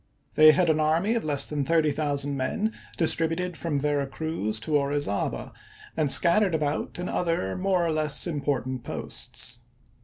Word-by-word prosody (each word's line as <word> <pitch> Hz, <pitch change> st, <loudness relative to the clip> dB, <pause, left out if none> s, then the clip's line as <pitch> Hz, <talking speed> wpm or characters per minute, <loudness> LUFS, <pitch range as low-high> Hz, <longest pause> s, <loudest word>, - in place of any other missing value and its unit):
They 155 Hz, 0 st, +8 dB
had 180 Hz, +2 st, +2 dB
an 155 Hz, -, 0 dB
army 160 Hz, +8 st, +1 dB
of 235 Hz, -, -1 dB
less 145 Hz, -2 st, +1 dB
than 150 Hz, -2 st, -2 dB
thirty 160 Hz, 0 st, +2 dB
thousand 145 Hz, -1 st, -1 dB
men 215 Hz, -, -2 dB, 0.2 s
distributed 165 Hz, +2 st, +1 dB
from 160 Hz, -4 st, -2 dB
Vera 145 Hz, -1 st, -1 dB
Cruz 135 Hz, -8 st, -3 dB
to 150 Hz, +7 st, -1 dB
Ori 140 Hz, 0 st, +1 dB
zaba 100 Hz, -8 st, -3 dB, 0.4 s
and 150 Hz, -3 st, +2 dB
scattered 180 Hz, +1 st, +5 dB
about 150 Hz, -1 st, -2 dB
in 180 Hz, +1 st, -4 dB
other 165 Hz, -, -1 dB
more 185 Hz, -2 st, 0 dB
or 165 Hz, -, 0 dB
less 155 Hz, -2 st, 0 dB
im 155 Hz, -5 st, -3 dB
portant 130 Hz, -3 st, -2 dB
posts. -, -, -4 dB
155 Hz, 165 wpm, -26 LUFS, 140-170 Hz, 0.4 s, They